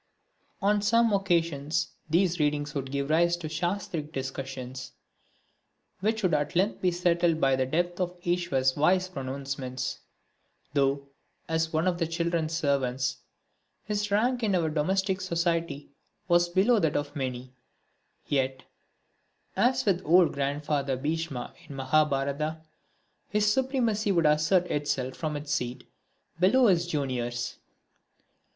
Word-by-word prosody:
On 205 Hz, +1 st, +3 dB
some 230 Hz, +2 st, +3 dB
occasions 165 Hz, -6 st, 0 dB, 0.2 s
these 175 Hz, +2 st, +2 dB
readings 150 Hz, 0 st, 0 dB
would 135 Hz, -2 st, -3 dB
give 140 Hz, +1 st, -2 dB
rise 170 Hz, +2 st, +3 dB
to 170 Hz, -2 st, -6 dB
shastric 165 Hz, -1 st, -3 dB
discussions, 135 Hz, -2 st, -6 dB, 1.1 s
which 220 Hz, +3 st, 0 dB
would 185 Hz, -, +2 dB
at 150 Hz, +3 st, 0 dB
length 195 Hz, +5 st, +1 dB
be 185 Hz, -, +3 dB
settled 170 Hz, -2 st, +2 dB
by 135 Hz, -2 st, +3 dB
the 130 Hz, 0 st, 0 dB
depth 175 Hz, +5 st, -1 dB
of 180 Hz, 0 st, -2 dB
Iswar's 170 Hz, -7 st, +1 dB
wise 180 Hz, +5 st, +3 dB
pronouncements. 135 Hz, -3 st, -4 dB, 0.7 s
Though, 140 Hz, 0 st, +1 dB, 0.4 s
as 160 Hz, 0 st, 0 dB
one 160 Hz, +3 st, +1 dB
of 175 Hz, -1 st, 0 dB
the 165 Hz, -, +1 dB
children's 165 Hz, -1 st, -1 dB
servants, 135 Hz, -5 st, 0 dB, 0.7 s
his 210 Hz, 0 st, -2 dB
rank 240 Hz, +5 st, +2 dB
in 205 Hz, -4 st, +1 dB
our 165 Hz, -3 st, +1 dB
domestic 190 Hz, +5 st, 0 dB
society 170 Hz, -5 st, -1 dB, 0.4 s
was 175 Hz, -1 st, +4 dB
below 200 Hz, +6 st, +3 dB
that 160 Hz, -6 st, +1 dB
of 145 Hz, +1 st, -2 dB
many, 130 Hz, -2 st, -4 dB, 0.7 s
yet, 130 Hz, -2 st, -1 dB, 0.9 s
as 250 Hz, +5 st, +2 dB
with 190 Hz, -4 st, +1 dB
old 175 Hz, +2 st, +5 dB
Grandfather 140 Hz, -1 st, -1 dB
Bhisma 150 Hz, -2 st, -3 dB, 0.2 s
in 140 Hz, -, -7 dB
the 135 Hz, -, -3 dB
Mahabharata, 150 Hz, +1 st, +1 dB, 0.7 s
his 210 Hz, 0 st, +2 dB
supremacy 235 Hz, -6 st, +1 dB
would 170 Hz, -4 st, +2 dB
assert 155 Hz, +4 st, +3 dB
itself 135 Hz, -3 st, -1 dB
from 155 Hz, -2 st, -3 dB
his 145 Hz, 0 st, -5 dB
seat, 125 Hz, -3 st, -2 dB, 0.6 s
below 220 Hz, +8 st, +5 dB
his 175 Hz, -5 st, +3 dB
juniors. 125 Hz, -6 st, -2 dB
160 Hz, 130 wpm, -28 LUFS, 140-180 Hz, 1.1 s, old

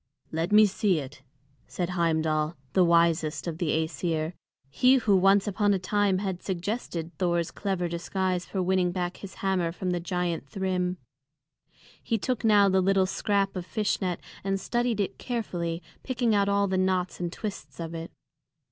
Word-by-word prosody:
"Let 165 Hz, +3 st, -1 dB
me 215 Hz, +1 st, +8 dB
see 200 Hz, -2 st, +1 dB
it," 140 Hz, -2 st, -7 dB, 0.5 s
said 175 Hz, -1 st, -3 dB
Heimdal, 160 Hz, -2 st, +1 dB, 0.2 s
the 185 Hz, -, +5 dB
wisest 170 Hz, -2 st, +2 dB
of 165 Hz, -2 st, -4 dB
the 170 Hz, -, 0 dB
Æsir, 160 Hz, +1 st, -1 dB, 0.4 s
he 255 Hz, -, +5 dB
who 220 Hz, -6 st, +3 dB
once 195 Hz, +1 st, +5 dB
upon 205 Hz, 0 st, +2 dB
a -, -, +1 dB
time 195 Hz, +1 st, +1 dB
had 190 Hz, -2 st, -3 dB
suggested 180 Hz, -3 st, -4 dB
Thor's 170 Hz, -2 st, +1 dB
clever 190 Hz, -3 st, -2 dB
disguise 180 Hz, +2 st, -1 dB
for 190 Hz, -2 st, -2 dB
winning 180 Hz, -1 st, +2 dB
back 180 Hz, 0 st, -3 dB
his 195 Hz, -, -9 dB
hammer 185 Hz, -3 st, +1 dB
from 180 Hz, +1 st, -3 dB
the 175 Hz, -, 0 dB
giant 175 Hz, -4 st, -2 dB
Thrym. 185 Hz, -1 st, -1 dB, 1.0 s
He 225 Hz, -, 0 dB
took 245 Hz, +2 st, -2 dB
now 205 Hz, -2 st, +6 dB
the 190 Hz, -1 st, +3 dB
little 190 Hz, 0 st, +3 dB
scrap 195 Hz, +1 st, 0 dB
of 180 Hz, -, -3 dB
fish 210 Hz, +3 st, -1 dB
net 180 Hz, -2 st, -1 dB, 0.2 s
and 195 Hz, 0 st, 0 dB
studied 240 Hz, +1 st, 0 dB
it 200 Hz, -, -2 dB
carefully, 175 Hz, -8 st, -3 dB, 0.2 s
picking 245 Hz, -3 st, 0 dB
out 200 Hz, -1 st, +3 dB
all 200 Hz, 0 st, +2 dB
the 190 Hz, -1 st, 0 dB
knots 185 Hz, -1 st, 0 dB
and 175 Hz, -1 st, -2 dB
twists 205 Hz, -1 st, -7 dB
of 165 Hz, 0 st, -5 dB
it. 165 Hz, 0 st, -6 dB
185 Hz, 170 wpm, -27 LUFS, 170-200 Hz, 1.0 s, me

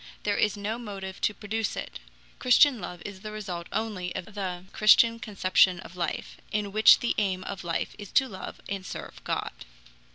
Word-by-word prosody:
There 205 Hz, -1 st, +1 dB
is 210 Hz, 0 st, +2 dB
no 210 Hz, +3 st, -3 dB
motive 195 Hz, -4 st, -7 dB
to 210 Hz, -, +2 dB
produce 220 Hz, +1 st, -2 dB
it. -, -, -6 dB, 0.4 s
Christian 250 Hz, -1 st, +5 dB
love 175 Hz, -2 st, -7 dB
is 200 Hz, -2 st, -7 dB
the 215 Hz, 0 st, -6 dB
result 185 Hz, -5 st, -5 dB
only 205 Hz, -5 st, -3 dB
of 195 Hz, +4 st, -6 dB
the 185 Hz, -3 st, -4 dB
Christian 230 Hz, +2 st, +6 dB
conception 185 Hz, -5 st, +3 dB
of 175 Hz, -, -12 dB
life, 175 Hz, -1 st, -3 dB
in 205 Hz, -1 st, -1 dB
which 215 Hz, +2 st, +7 dB
the 240 Hz, -, +1 dB
aim 190 Hz, -3 st, 0 dB
of 195 Hz, 0 st, -6 dB
life 165 Hz, -1 st, -2 dB
is 205 Hz, -2 st, -9 dB
to 265 Hz, -, +4 dB
love 190 Hz, -5 st, -8 dB
and 195 Hz, -1 st, -4 dB
serve -, -, -8 dB
God. -, -, -2 dB
205 Hz, 185 wpm, -27 LUFS, 185-215 Hz, 0.4 s, which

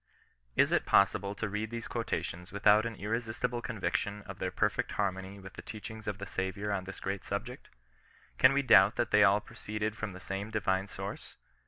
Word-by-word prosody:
Is -, -, +4 dB
it -, -, +2 dB
possible 100 Hz, +1 st, +3 dB
to 105 Hz, -, -2 dB
read 105 Hz, +2 st, -3 dB
these 115 Hz, 0 st, -5 dB
quotations 90 Hz, -6 st, -3 dB
without 105 Hz, +2 st, +4 dB
an 115 Hz, -, -6 dB
irresistible 115 Hz, +3 st, -2 dB
conviction 100 Hz, -2 st, -2 dB
of -, -, -9 dB
their -, -, -1 dB
perfect -, -, 0 dB
harmony 95 Hz, -1 st, -2 dB
with 95 Hz, 0 st, -11 dB
the -, -, -8 dB
teachings 110 Hz, 0 st, -8 dB
of 105 Hz, -2 st, -2 dB
the 100 Hz, -, -6 dB
Saviour 100 Hz, +2 st, -3 dB
on 95 Hz, -2 st, -1 dB
this 100 Hz, -, -8 dB
great 95 Hz, 0 st, -3 dB
subject? -, -, -5 dB, 0.7 s
Can 130 Hz, -, +8 dB
we 140 Hz, 0 st, +2 dB
doubt 105 Hz, -5 st, +7 dB
that 120 Hz, -, 0 dB
they 105 Hz, 0 st, +6 dB
all 100 Hz, 0 st, +6 dB
proceeded 105 Hz, 0 st, -4 dB
from 105 Hz, -2 st, -4 dB
the 95 Hz, -, -9 dB
same 100 Hz, +3 st, -4 dB
Divine 95 Hz, -3 st, 0 dB
source -, -, -7 dB
105 Hz, 190 wpm, -31 LUFS, 95-110 Hz, 0.7 s, Can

